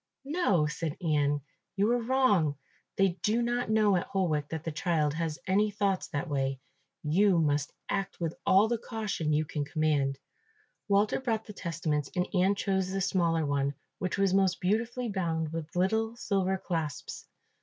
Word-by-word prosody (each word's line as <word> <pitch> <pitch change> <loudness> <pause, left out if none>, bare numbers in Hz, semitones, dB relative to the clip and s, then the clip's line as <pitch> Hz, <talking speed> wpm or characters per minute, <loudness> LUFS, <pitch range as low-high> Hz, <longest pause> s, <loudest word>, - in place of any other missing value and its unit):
"No," 275 - +2
said 155 +1 -3
Ian, 145 -4 +1 0.3
"you 205 +3 +2
are 245 0 +2
wrong, 225 - +3 0.4
they 190 -2 +2
do 220 +3 +2
not 240 -1 -1
know 215 -2 +4
at 175 - -1
Holwick 155 -7 0
that 160 -1 -4
the 165 - -3
child 155 -2 0
has 160 -1 -2
any 205 +3 +3
thoughts 200 -2 0
that 145 +4 -3
way; 135 -2 -1 0.4
you 180 +5 +3
must 145 -2 +1 0.2
act 195 -1 -2
with 165 -2 -1
all 195 +3 +5
the 235 0 -1
caution 210 -10 -2
you 155 +1 +2
can 150 -1 -3
command." 145 -3 0 0.7
Walter 200 +1 +3
brought 225 -4 -1
the 210 - -9
testaments 160 -6 -2
and 180 0 +1
Ian 190 +1 +3
chose 190 -2 0
the 195 +1 -2
smaller 170 -4 +1
one, 140 0 0 0.2
which 185 +2 -2
was 195 -1 +2
most 190 -2 +3
beautifully 230 +6 0
bound 165 -6 -2
with 165 0 -5
little 220 +5 +1
silver 190 -4 0
clasps. 160 -7 -4
180 Hz, 165 wpm, -29 LUFS, 155-205 Hz, 0.7 s, all